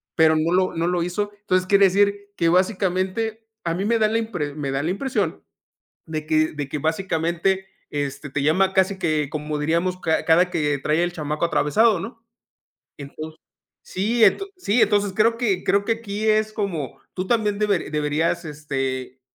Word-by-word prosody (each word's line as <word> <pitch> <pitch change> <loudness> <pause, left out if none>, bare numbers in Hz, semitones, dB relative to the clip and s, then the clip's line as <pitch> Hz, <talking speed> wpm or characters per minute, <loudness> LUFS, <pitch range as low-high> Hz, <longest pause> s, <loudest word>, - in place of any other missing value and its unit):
pero 160 -1 +5
no 165 +2 +1
lo 185 0 +2
no 165 +1 0
lo 175 -1 0
hizo. 205 +4 -2
Entonces 185 -2 +1
quiere 200 0 +6
decir 200 +1 +2
que 170 - +2
básicamente 190 +4 0 0.2
a 170 - 0
mí 190 - -2
me 230 +1 +2
da 215 - +4
la 225 +1 +1
impre 180 -11 -3
me 140 -3 -3
da 135 +1 -1
la 170 - 0
impresión, 200 - -2 0.6
de 155 -1 -4
que 155 0 +2
de 145 -2 -4
que 150 - -3
básicamente, 170 +3 -1 0.2
este, 140 -1 -4
te 140 0 -2
llama 190 +6 +3
casi 190 0 +2
que 155 -5 0
como 150 -1 -3
diríamos, 170 +4 0
ca 160 -2 0
cada 175 +3 +4
que 150 -4 0
trae 155 +3 +1
el 175 - -2
chamaco 155 0 -2
atravesado, 205 +6 +3
¿no? 225 +3 -9 0.7
Entonces 155 +3 -9 0.4
Sí 220 +5 -1
Ent 210 - +4
sí 240 - +2
entonces 205 -1 +2
creo 230 +3 +2
que 205 -7 0
creo 200 0 +2
que 230 - +3
aquí 215 -1 -4
es 215 0 +2
como 185 -10 -4
tú 185 0 -3
también 210 -2 +1
deber 205 -7 0
deberías, 155 +3 0
este, 135 -4 -4
180 Hz, 180 wpm, -23 LUFS, 155-205 Hz, 0.7 s, quiere